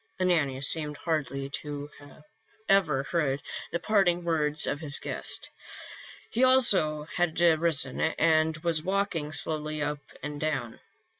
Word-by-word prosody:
Ananias 145 -7 +1
seemed 150 -2 -1
hardly 140 -4 -2
to 145 -1 -5 0.8
have 195 -2 +4 0.2
heard 145 -4 0 0.3
the - - 0
parting 180 -3 +2
words 150 -3 +1
of 145 - -2
his 150 -3 +3
guest; - - -2 0.8
he 240 - +1
also 200 -13 +3
had 170 +1 -2
risen 160 -5 +3
and 160 0 +2
was 165 -2 +1
walking 185 -4 -1
slowly 155 0 +1
up 145 0 -2 0.2
and 150 0 -5
down. 145 -7 -3
155 Hz, 125 wpm, -28 LUFS, 150-175 Hz, 0.8 s, have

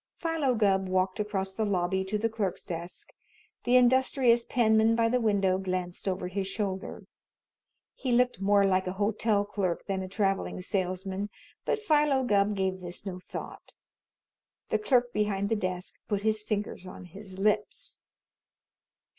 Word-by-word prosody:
Philo 320 -6 0
Gubb 195 -3 +2
walked 185 +2 +1
across 195 -2 -2
the 220 - -1
lobby 190 -2 0
to 205 +3 -1
the 225 +2 +1
clerk's 215 -5 -3
desk. 170 -1 -6 0.5
The 245 - +4
industrious 250 -1 +4
penman 220 -2 +3
by 230 0 +3
the 250 +1 +1
window 195 -4 +2
glanced 185 -1 -3
over 185 -1 -1
his 190 +1 -2
shoulder. 195 -1 -3 0.9
He 260 - -3
looked 245 -5 +2
more 200 0 +4
like 185 -1 +2
a 185 - -2
hotel 205 +1 +1
clerk 190 -4 -2
than 195 -1 -2
like 190 - -4
a - - -16
traveling 195 -2 0
salesman, 190 +1 -2 0.4
but - - +1
Philo 300 -9 +3
Gubb 205 -3 +2
gave 190 -1 -1
this 175 +2 -6
no 185 -2 -5
thought. - - -9 0.9
The - - +1
clerk 245 - +2
behind 200 -1 0
the 225 - +2
desk 185 -2 -3
put 205 -2 -1
his 215 -1 +2
fingers 205 -3 -3
on 185 - -9
his 190 +2 -9
lips. 210 +2 0
200 Hz, 155 wpm, -29 LUFS, 190-225 Hz, 0.9 s, The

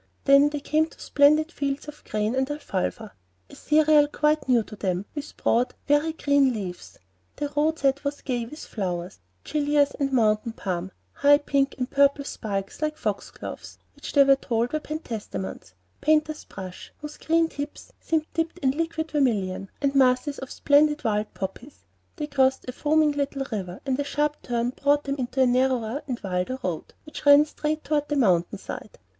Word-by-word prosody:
Then 280 +1 +6
they 295 0 -4
came 310 +2 +1
to - - -19
splendid 305 +3 +3
fields 280 -2 -3
of 300 0 -10
grain 215 +2 -1
and 265 +1 0
"afalfa," 220 -6 -3 0.4
a - - -12
cereal 305 -1 +4
quite 300 -1 0
new 240 -3 +4
to 215 - -11
them, 190 -2 -2
with 295 -1 -7
broad, 240 +2 +1
very 295 +2 +2
green 285 -4 +3
leaves. 185 -5 -7 0.4
The 290 -1 -4
roadside 295 -2 +1
was 285 0 -3
gay 245 -3 -2
with 300 +6 -9
flowers, 180 - -4 0.2
gillias 290 -1 +2
and 275 -1 0
mountain 225 -2 +2
balm; 185 -1 -3 0.2
high 285 +1 +5
pink 280 -1 0
and 250 -1 -2
purple 280 +1 +3
spikes, 200 -2 -4
like 305 0 -1
foxgloves, - - -5 0.2
which - - -8
they 280 - +7
were 275 0 +5
told 235 -1 -1
were 310 - +1
pentstemons; 215 - -6 0.3
painters' 310 0 +1
brush, 185 -2 -9
whose 300 0 -9
green 330 0 +2
tips 290 -2 -7
seemed 315 -2 0
dipped 330 +1 -2
in 270 -6 +1
liquid 320 +1 -3
vermilion, 200 -9 0
and 280 0 +2
masses 265 +1 +3
of 265 - -6
the - - -10
splendid 295 +1 +3
wild 210 -2 0
poppies. 200 +9 -7 0.3
They 300 - -3
crossed 265 -3 +1
a - - -2
foaming 305 +3 +2
little 280 -1 -2
river; 185 -4 -5
and 265 -1 -1
a - - +1
sharp 295 +1 -1
turn 240 0 -1
brought 285 +2 +1
them 280 0 -3
into 260 +1 +1
a - - +5
narrower 255 0 +1
and 250 -3 -3
wilder 185 +6 -2
road, 175 -4 -4
which 305 - -9
ran 285 +1 +7
straight 310 0 -3
toward 295 -1 -1
the 295 - 0
mountain 190 -7 +2
side. 200 - -8
275 Hz, 175 wpm, -25 LUFS, 230-295 Hz, 0.4 s, they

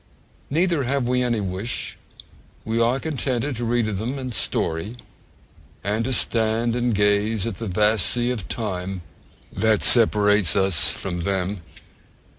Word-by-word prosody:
Neither 165 -2 +1
have 135 -1 -1
we 125 0 +1
any 120 -3 0
wish: 95 +4 -3 0.7
we 115 +1 0
are 120 +3 +2
contented 135 -3 -2
to 120 - -3
read 120 -1 0
of 100 -3 -3
them 125 +6 -3
in 130 -2 -5
story, 95 0 -1 0.9
and 105 +3 -1
to 130 - -2
stand 115 -1 +2
and 120 -2 0
gaze 105 +1 +1
at 115 - -3
the 115 - -3
vast 105 +2 +2
sea 120 0 0
of 110 -7 -5
time 95 -5 -4 0.5
that 110 -2 +1
separates 105 -5 +5
us 90 -6 +3
from 90 0 -4
them. 95 +1 -2
110 Hz, 145 wpm, -22 LUFS, 100-120 Hz, 0.9 s, separates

